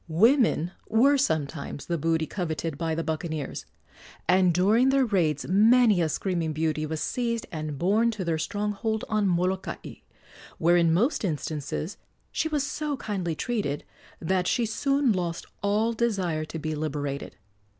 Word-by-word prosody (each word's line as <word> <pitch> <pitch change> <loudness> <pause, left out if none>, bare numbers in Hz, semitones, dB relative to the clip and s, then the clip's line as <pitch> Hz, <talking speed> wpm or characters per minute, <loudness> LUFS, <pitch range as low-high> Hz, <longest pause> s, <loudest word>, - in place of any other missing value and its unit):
Women 200 - +3 0.2
were 265 +6 +5
sometimes 150 - -1
the 170 -2 -2
booty 160 +1 +1
coveted 165 -3 -3
by 160 +1 -2
the 165 - -2
buccaneers, 155 -2 -4 0.6
and 185 -1 +4
during 210 +9 +4
their 270 -1 +3
raids 170 - 0
many 215 +1 +5
a 160 - +1
screaming 170 -2 -1
beauty 155 0 -1
was 155 0 -3
seized 235 +2 -1
and 155 -3 -4
borne 210 +9 +3
to 190 - -3
their 165 -2 0
stronghold 210 +4 -2
on 215 -2 +2
Molokai, 185 +1 -2 0.6
where 170 +2 +4
in 170 -2 +4
most 225 - +2
instances 155 0 -3 0.3
she - - 0
was 295 -3 0
so 300 -1 -3
kindly 190 -8 -3
treated 200 - -2 0.4
that 180 +2 0
she 240 - +2
soon 275 +3 +1
lost 175 -3 -3 0.2
all 210 +3 +1
desire 190 -9 0
to 160 - -7
be 155 0 -3
liberated. 145 -2 -3
180 Hz, 150 wpm, -26 LUFS, 160-220 Hz, 0.6 s, were